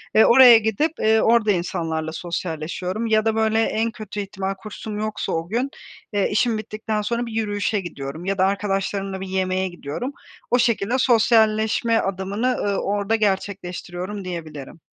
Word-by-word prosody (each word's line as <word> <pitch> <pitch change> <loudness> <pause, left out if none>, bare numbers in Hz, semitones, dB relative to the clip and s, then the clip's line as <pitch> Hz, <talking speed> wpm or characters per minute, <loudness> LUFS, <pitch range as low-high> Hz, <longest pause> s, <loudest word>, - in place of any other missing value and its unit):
ve 220 - +7
oraya 245 -1 +9
gidip, 220 +8 0
ııı, 220 0 +3
orada 225 -2 +4
insanlarla 165 -3 -2
sosyalleşiyorum 175 +5 -4
ya 220 -1 +2
da, 220 -1 +1
böyle, 220 0 +2
en 225 +1 0
kötü 210 -1 -7
ihtimal 195 -1 -3
kursum 210 +1 -7
yoksa 215 0 -3
o 165 0 -2
gün, 245 +5 -1 0.4
eee, 205 -1 +1
işim 220 +2 +2
bittikten 215 0 -3
sonra 235 +3 -1
bir 230 - -7
yürüyüşe 205 -1 -1
gidiyorum 155 -1 -7
ya 195 +1 -1
da 185 - +4
arkadaşlarımla 195 -1 -1
bir 190 - -5
yemeğe 185 0 0
gidiyorum. 175 - -5 0.4
O 245 - +4
şekilde 230 -1 +1
sosyalleşme 225 -2 +3
adımını, 195 +1 -3
ııı, 205 -6 0
orada 205 +2 0
gerçekleştiriyorum 190 -1 -3
diyebilirim. 160 -4 -7
205 Hz, 155 wpm, -22 LUFS, 185-220 Hz, 0.4 s, oraya